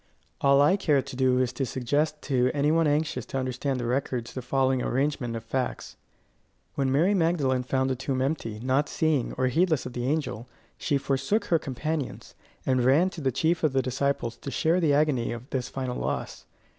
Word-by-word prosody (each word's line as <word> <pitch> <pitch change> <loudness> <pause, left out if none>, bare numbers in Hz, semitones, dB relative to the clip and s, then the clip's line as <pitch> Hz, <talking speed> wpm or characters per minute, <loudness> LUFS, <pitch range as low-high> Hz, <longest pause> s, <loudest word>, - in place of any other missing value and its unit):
All 140 0 +5
I 185 +7 +4
care 145 -8 +2
to 135 0 -9
do 130 -1 +2
is 130 -1 +1
to 140 - -2
suggest 145 +5 -1
to 125 -2 +2
any 145 +1 +2
one 165 0 +3
anxious 150 +2 0
to - - -4
understand 130 +1 -2
the 120 - -3
records 125 -1 -2
the 130 - -4
following 130 0 +1
arrangement 130 -2 -1
of 115 - -5
facts. 125 +3 -3 0.8
When 135 -1 0
Mary 165 +9 +3
Magdalene 160 -8 +1
found 130 +1 0
the 130 - 0
tomb 130 +1 -2
empty, 130 -6 -2
not 135 +3 +1
seeing, 155 -6 0
or 130 - 0
heedless 155 +3 +2
of 125 - -6
the 120 0 -3
angel, 140 -6 -2 0.3
she 145 -4 +1
forsook 135 +10 0
her 165 - +2
companions, 145 +1 -4 0.3
and 130 -1 +2
ran 150 +9 +4
to 165 - -8
the 135 -2 +1
chief 165 +6 +1
of 155 -4 +2
the 135 -1 +2
disciples 130 -2 -1
to - - -7
share 165 +5 +1
the 160 -4 +2
agony 145 -5 +1
of 120 +2 -7
this 125 -2 -2
final 130 -2 -4
loss. - - -4
135 Hz, 195 wpm, -27 LUFS, 125-150 Hz, 0.8 s, All